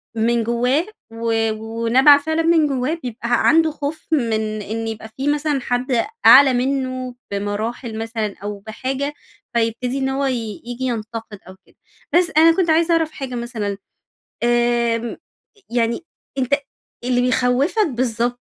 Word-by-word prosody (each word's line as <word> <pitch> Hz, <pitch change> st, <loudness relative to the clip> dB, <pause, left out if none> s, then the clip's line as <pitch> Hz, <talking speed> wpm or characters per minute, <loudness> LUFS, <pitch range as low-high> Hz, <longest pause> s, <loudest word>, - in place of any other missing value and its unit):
من 230 Hz, +1 st, +1 dB
جوّاه 245 Hz, +7 st, +1 dB, 0.3 s
و 225 Hz, -1 st, 0 dB
ونابعة 230 Hz, +6 st, +4 dB
فعلًا 315 Hz, +2 st, -1 dB
من 325 Hz, -2 st, +4 dB
جوّاه 270 Hz, +2 st, -1 dB
بيبقى 240 Hz, 0 st, 0 dB
عنده 320 Hz, -1 st, +4 dB
خوف 295 Hz, +1 st, -5 dB
من 240 Hz, -8 st, +1 dB, 0.3 s
إن 225 Hz, +2 st, -4 dB
يبقى 220 Hz, 0 st, -6 dB
في 270 Hz, +2 st, -2 dB
مثلًا 295 Hz, -2 st, 0 dB
حد 245 Hz, 0 st, 0 dB, 0.2 s
أعلى 270 Hz, -1 st, +9 dB
منه 255 Hz, -1 st, -2 dB, 0.2 s
بمراحل 215 Hz, +3 st, -3 dB
مثلًا 225 Hz, -2 st, -3 dB
أو 205 Hz, -1 st, -5 dB
بحاجة، 260 Hz, +7 st, -4 dB, 0.4 s
فيبتدي 235 Hz, +3 st, 0 dB
إن 265 Hz, -1 st, 0 dB
هو 275 Hz, +1 st, -1 dB
ي 230 Hz, -6 st, -3 dB
ييجي 245 Hz, +1 st, -5 dB
ينتقد 225 Hz, -3 st, -5 dB
أو 185 Hz, -, -11 dB
كده. -, -, -26 dB, 0.4 s
بس 350 Hz, -1 st, +4 dB
أنا 325 Hz, +1 st, +7 dB
كنت 365 Hz, -3 st, +1 dB
عايزة 325 Hz, +2 st, +3 dB
أعرف 325 Hz, -1 st, +1 dB
حاجة 265 Hz, -4 st, -6 dB
مثلًا 225 Hz, -5 st, -3 dB, 0.7 s
آمم، 240 Hz, -1 st, +1 dB, 0.5 s
يعني 235 Hz, +5 st, 0 dB, 0.3 s
أنتَ 260 Hz, +1 st, +2 dB, 0.5 s
اللي 245 Hz, 0 st, +2 dB
بيخوفك 255 Hz, -, +2 dB
بالضبط 245 Hz, -1 st, -1 dB
245 Hz, 140 wpm, -20 LUFS, 230-275 Hz, 0.7 s, أعلى